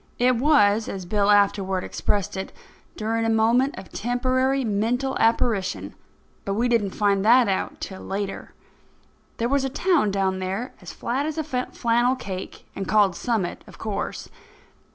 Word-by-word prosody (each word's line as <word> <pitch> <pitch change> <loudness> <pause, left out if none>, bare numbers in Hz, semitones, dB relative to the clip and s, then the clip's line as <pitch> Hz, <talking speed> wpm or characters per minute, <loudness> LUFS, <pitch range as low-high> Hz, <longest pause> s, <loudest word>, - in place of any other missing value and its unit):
It 250 0 +3
was, 225 -6 +3
as 190 -2 -5
Bill 205 +2 +1
afterward 195 -2 +3
expressed 200 -2 -1
it, 190 0 -5 0.5
"during 225 +1 -1
a 225 - +1
moment 230 +5 +2
of 190 0 -10
temporary 255 +3 0
mental 235 +6 0
apparition"; 220 -4 +1 0.5
but 195 - -2
we 235 +3 +1
didn't 225 -5 +1
find 200 -2 +2
that 240 +2 +6
out 190 -1 -2
till 190 -1 -7
later. 195 0 -5 0.8
There 230 - 0
was 275 +1 +1
a 270 - -1
town 320 - +2
down 190 -1 0
there, 195 +7 -3
as - - -8
flat 265 +5 -2
as 315 - -4
a 315 - 0
flannel 250 -3 0
cake, 190 -7 -7
and 195 -1 -4
called 205 -4 +3
Summit, 220 -6 -2
of - - -14
course. 215 -2 -4
220 Hz, 155 wpm, -24 LUFS, 195-250 Hz, 0.8 s, that